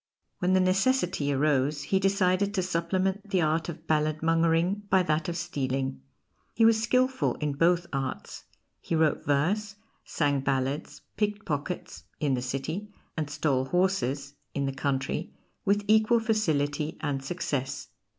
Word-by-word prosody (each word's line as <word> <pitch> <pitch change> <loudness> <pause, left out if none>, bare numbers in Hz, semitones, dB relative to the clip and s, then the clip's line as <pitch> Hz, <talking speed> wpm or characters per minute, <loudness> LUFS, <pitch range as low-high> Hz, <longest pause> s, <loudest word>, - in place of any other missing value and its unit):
When 185 0 +2
the 190 - +5
necessity 185 - +2
arose 145 0 +1
he 190 +6 +1
decided 195 +1 +2
to 185 - +1
supplement 185 +3 -1
the 190 -3 +2
art 160 +1 +1
of 165 -1 -8
balladmongering 165 +5 +1
by 190 -1 +4
that 155 -1 0
of 170 - -3
stealing. 135 - -2 0.5
He 225 - +4
was 225 -1 +5
skilful 255 +3 +1
in 150 -2 -2
both 170 +4 +3
arts: 135 -1 -4 0.3
he 165 - -2
wrote 160 -1 +2
verse, 195 +9 0 0.3
sang 145 -3 0
ballads, 135 +2 -2
picked 210 -1 -1
pockets 150 +3 -4
(in 145 -4 +1
the 125 - 0
city), 145 +11 -4 0.2
and 155 -2 -2
stole 145 -3 0
horses 140 -5 0 0.2
(in 140 - 0
the 135 - -2
country) 135 0 -2 0.3
with 205 +1 +2
equal 220 +2 +4
facility 155 -10 0
and 140 -3 -2
success. 140 -4 -3
165 Hz, 140 wpm, -28 LUFS, 145-195 Hz, 0.5 s, the